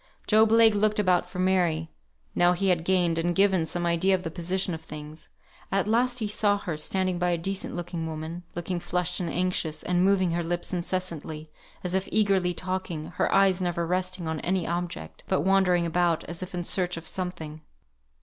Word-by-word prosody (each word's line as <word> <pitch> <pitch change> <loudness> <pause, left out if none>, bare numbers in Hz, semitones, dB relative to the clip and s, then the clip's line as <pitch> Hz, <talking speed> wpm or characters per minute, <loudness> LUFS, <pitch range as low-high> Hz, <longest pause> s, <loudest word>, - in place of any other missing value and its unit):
Job 220 0 +5
Legh 225 -1 +6
looked 210 +1 +1
about 180 -3 +2
for 180 - -9
Mary, 175 -4 +1 0.4
now 175 0 +4
he 190 +2 0
had 175 -3 +2
gained, 175 -2 +2
and 175 +1 0
given, 195 -4 +3
some 175 +1 -2
idea 170 +3 +3
of 185 - -4
the 165 - -4
position 180 +2 -2
of 160 - -5
things. 155 0 -9 0.4
At 195 +1 +1
last 245 +3 +2
he 220 -4 -1
saw 205 -1 +2
her, 180 -5 -4
standing 185 +3 -1
by 180 0 +1
a 175 - +1
decent 190 +3 -3
looking 175 -1 -4
woman, 160 +2 -5
looking 175 +1 -3
flushed 180 0 -1
and 175 -2 -2
anxious, 175 -3 -1
and 180 0 +1
moving 190 -2 +3
her 170 +1 0
lips 175 +2 -3
incessantly, 170 -4 -3 0.3
as 180 0 -3
if 190 +1 0
eagerly 195 -4 +3
talking; 180 -4 -4
her - - +1
eyes 195 -1 +4
never 175 -1 -1
resting 180 0 -2
on 160 -1 -2
any 180 +1 0
object, 175 +1 -4
but 190 - +1
wandering 185 -2 +3
about 170 0 +1
as 170 +1 -7
if 185 0 -6
in 175 - -2
search 180 -1 0
of 165 - -8
something. 165 -4 -4
180 Hz, 195 wpm, -27 LUFS, 170-190 Hz, 0.4 s, Legh